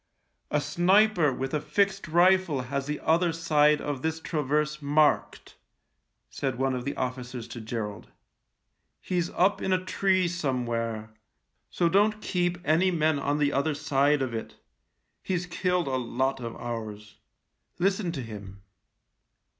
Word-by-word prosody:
" -, -, -49 dB
A 150 Hz, -, +1 dB
sniper 175 Hz, +1 st, +3 dB
with 135 Hz, +2 st, -4 dB
a 150 Hz, -, 0 dB
fixed 200 Hz, +1 st, 0 dB
rifle 175 Hz, -3 st, +3 dB
has 135 Hz, +2 st, -3 dB
the 150 Hz, 0 st, -3 dB
other 170 Hz, +2 st, +2 dB
side 150 Hz, -2 st, +3 dB
of 145 Hz, -3 st, -4 dB
this 160 Hz, +1 st, -2 dB
traverse 150 Hz, -1 st, -1 dB
marked," 150 Hz, +1 st, +1 dB, 0.7 s
said 135 Hz, -3 st, -3 dB
one 135 Hz, 0 st, +1 dB
of 125 Hz, -1 st, -4 dB
the 140 Hz, -, -3 dB
officers 125 Hz, -2 st, -4 dB
to 120 Hz, -, -7 dB
Gerald. 110 Hz, -2 st, -5 dB, 0.5 s
" -, -, -52 dB, 0.3 s
He's 175 Hz, -2 st, -1 dB
up 195 Hz, +3 st, +2 dB
in 190 Hz, -, -1 dB
a 185 Hz, 0 st, +1 dB
tree 185 Hz, -1 st, +2 dB
somewhere 120 Hz, -9 st, -2 dB, 0.3 s
— -, -, -50 dB
so 175 Hz, -, +1 dB
don't 210 Hz, +4 st, +3 dB
keep 175 Hz, -4 st, -1 dB
any 165 Hz, +5 st, +3 dB
men 160 Hz, -4 st, +1 dB
on 145 Hz, +1 st, 0 dB
the 145 Hz, -1 st, +1 dB
other 145 Hz, +2 st, +1 dB
side 145 Hz, -1 st, +2 dB
of 125 Hz, -3 st, -3 dB
it. 115 Hz, -, -5 dB, 0.7 s
He's 180 Hz, -2 st, -2 dB
killed 180 Hz, 0 st, 0 dB
a 130 Hz, -1 st, 0 dB
lot 130 Hz, +2 st, -1 dB
of 115 Hz, -2 st, -6 dB
ours. 110 Hz, -3 st, -6 dB, 0.6 s
Listen 190 Hz, 0 st, 0 dB
to 135 Hz, -6 st, -4 dB
him." 100 Hz, -3 st, -10 dB
150 Hz, 155 wpm, -27 LUFS, 130-175 Hz, 0.7 s, sniper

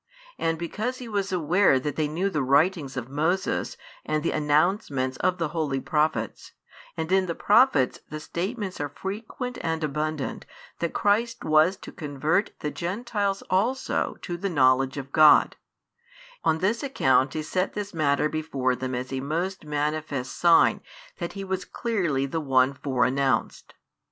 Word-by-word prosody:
And 165 Hz, 0 st, 0 dB
because 215 Hz, +9 st, -3 dB
He 250 Hz, -, -8 dB
was 200 Hz, -3 st, -2 dB
aware 175 Hz, -3 st, +3 dB
that 145 Hz, +1 st, -3 dB
they 155 Hz, -1 st, 0 dB
knew 180 Hz, +6 st, -1 dB
the 150 Hz, -, 0 dB
writings 140 Hz, +1 st, +2 dB
of 125 Hz, -2 st, -4 dB
Moses 160 Hz, +8 st, -1 dB, 0.3 s
and 155 Hz, 0 st, -1 dB
the -, -, +1 dB
announcements 150 Hz, -, +1 dB
of 185 Hz, 0 st, +1 dB
the 165 Hz, -3 st, -1 dB
Holy 150 Hz, -4 st, -1 dB
Prophets, 150 Hz, -, -1 dB, 0.4 s
and 160 Hz, +2 st, -3 dB
in 190 Hz, -1 st, +3 dB
the 170 Hz, -, -2 dB
Prophets 205 Hz, -, +3 dB
the 155 Hz, -, -5 dB
statements 190 Hz, +3 st, -4 dB
are 145 Hz, -, -2 dB
frequent 220 Hz, -, -6 dB
and 160 Hz, -1 st, -2 dB
abundant 155 Hz, 0 st, -3 dB, 0.3 s
that 170 Hz, -, -2 dB
Christ 225 Hz, +3 st, +1 dB
was 155 Hz, +5 st, +4 dB
to -, -, -10 dB
|89 -, -, -28 dB
convert 155 Hz, +6 st, 0 dB
the 150 Hz, -, -2 dB
Gentiles 200 Hz, +1 st, -2 dB
also 230 Hz, +9 st, 0 dB
to 175 Hz, -2 st, -4 dB
the 195 Hz, +3 st, -2 dB
knowledge 135 Hz, -3 st, +3 dB
of 135 Hz, 0 st, -6 dB
God: 155 Hz, -1 st, +6 dB, 0.9 s
on 160 Hz, -, +2 dB
this 205 Hz, +7 st, 0 dB
account 135 Hz, -, +2 dB
He 155 Hz, -, -2 dB
set 185 Hz, +4 st, -1 dB
this 205 Hz, -1 st, -5 dB
matter 150 Hz, -2 st, +2 dB
before 140 Hz, -5 st, -1 dB
them 130 Hz, 0 st, -4 dB
as 125 Hz, +2 st, -4 dB
a 135 Hz, -, -1 dB
most 165 Hz, +6 st, -3 dB
manifest 150 Hz, -3 st, -2 dB
sign 170 Hz, -1 st, +4 dB, 0.4 s
that -, -, -4 dB
He 195 Hz, -, -6 dB
was 190 Hz, -1 st, -3 dB
clearly 175 Hz, -, -1 dB
the 160 Hz, +4 st, -3 dB
One 135 Hz, -1 st, +3 dB
fore 130 Hz, -2 st, 0 dB
announced. 135 Hz, +1 st, -1 dB
155 Hz, 160 wpm, -26 LUFS, 140-190 Hz, 0.9 s, God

